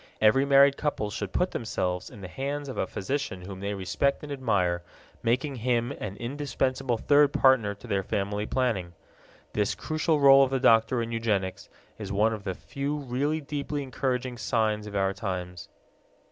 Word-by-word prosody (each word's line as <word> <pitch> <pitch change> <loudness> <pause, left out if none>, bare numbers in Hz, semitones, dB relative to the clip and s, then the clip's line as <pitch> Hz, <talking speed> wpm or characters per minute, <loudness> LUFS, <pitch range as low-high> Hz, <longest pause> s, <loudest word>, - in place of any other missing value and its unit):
Every 110 +6 +4
married 140 0 +6
couple 125 -8 -2
should 100 -2 -4
put 180 +1 0
themselves 90 -5 -2
in 105 - -12
the 95 - -6
hands 140 +9 -4
of 130 - -6
a 95 - 0
physician 100 -4 -3
whom 95 0 -8
they 100 +1 -3
respect 100 +11 0
and 150 - -7
admire, 100 -10 0 0.4
making 130 +4 0
him 120 0 0
an 100 -2 -6
indispensable 130 0 -1
third 145 +4 +4
partner 125 -8 +3
to 100 - -15
their 100 -1 0
family 100 +2 -2
planning. 110 -10 -1 0.6
This 105 -1 0
crucial 155 0 0
role 135 -1 +8
of 135 - +1
the 135 0 0
doctor 115 +1 +4
in 115 - -5
eugenics 105 -5 -1 0.3
is 100 -2 -5
one 105 +3 +2
of 105 -3 -7
the 95 - -2
few 140 +2 -4
really 145 +3 -1
deeply 145 0 -3
encouraging 130 -2 -2
signs 110 -2 0
of 105 - -7
our 95 0 +1
times. 90 -3 -5
115 Hz, 175 wpm, -27 LUFS, 100-140 Hz, 0.6 s, role